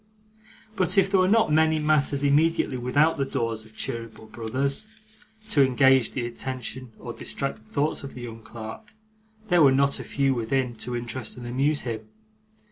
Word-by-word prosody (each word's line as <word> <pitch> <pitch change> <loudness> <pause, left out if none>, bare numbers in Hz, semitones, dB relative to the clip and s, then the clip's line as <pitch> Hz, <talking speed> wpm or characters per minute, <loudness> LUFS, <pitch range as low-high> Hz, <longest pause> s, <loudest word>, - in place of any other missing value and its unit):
But 185 +1 +1
if 195 0 +4
there 195 - +4
were 185 - +4
not 220 -6 +3
many 160 0 +4
matters 150 -2 +1
immediately 150 0 +2
without 145 +6 +2
the - - +2
doors 115 -4 -2
of 110 0 -19
Cheeryble 115 -1 -6
Brothers, 135 - -2 0.6
to 145 -9 +5
engage 130 -1 +4
the 120 - -2
attention 130 +1 -5
or - - -7
distract - - -3
the 110 - -24
thoughts 145 +8 -1
of 140 - -8
the 125 - -8
young 115 -2 -8
clerk, 115 - -9 0.5
there 175 -2 +5
were 140 -3 +7
not 140 +1 +2
a - - -5
few 135 -1 +1
within, 125 +1 -1
to 120 +3 -4
interest 120 0 -4
and 120 - -8
amuse 135 +5 0
him. 110 -3 -5
130 Hz, 175 wpm, -25 LUFS, 120-150 Hz, 0.6 s, were